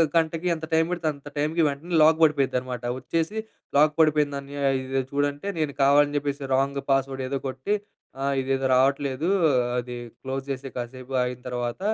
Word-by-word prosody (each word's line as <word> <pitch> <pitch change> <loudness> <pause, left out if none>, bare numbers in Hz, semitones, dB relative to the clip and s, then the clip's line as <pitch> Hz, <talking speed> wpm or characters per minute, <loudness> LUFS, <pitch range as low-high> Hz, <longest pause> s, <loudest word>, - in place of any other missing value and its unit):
గంటకి 165 +1 +1
ఎంత 160 0 -6
టైమ్ 160 0 +4
పడితే 175 -2 -2
అంత 140 0 -14
టైమ్‌కి 155 +3 +1
వెంటనే 145 +5 -4
లాక్ 160 +1 +6
పడిపోయిద్దన్నమాట. 130 -5 +1 0.2
వచ్చేసి 165 - -2 0.4
లాక్ 150 +1 +5
పడిపోయిందన్నయ్య. 145 -2 +1 0.2
ఇది 130 +1 -1
చూడంటే, 145 +4 -1
నేను 150 -2 0
కావాలని 145 +1 +4
చెప్పేసి 140 -1 -3
రాంగ్ 140 +1 +1
పాస్ 135 0 +3
వర్డ్ 135 0 -4
ఏదో 135 +1 -2
కొట్టి, 130 +10 -1 0.5
ఆ - - -1 0.2
ఇదేదో 135 0 -1
రావట్లేదు. 140 +3 +1 0.5
అది 125 0 -6 0.3
క్లోజ్ 135 0 -4
చేసేయి. 135 0 -5
కాసేపు 130 +2 -6
ఆగిన 125 0 -4
తర్వాత 120 +1 -3
140 Hz, 155 wpm, -25 LUFS, 130-150 Hz, 0.5 s, లాక్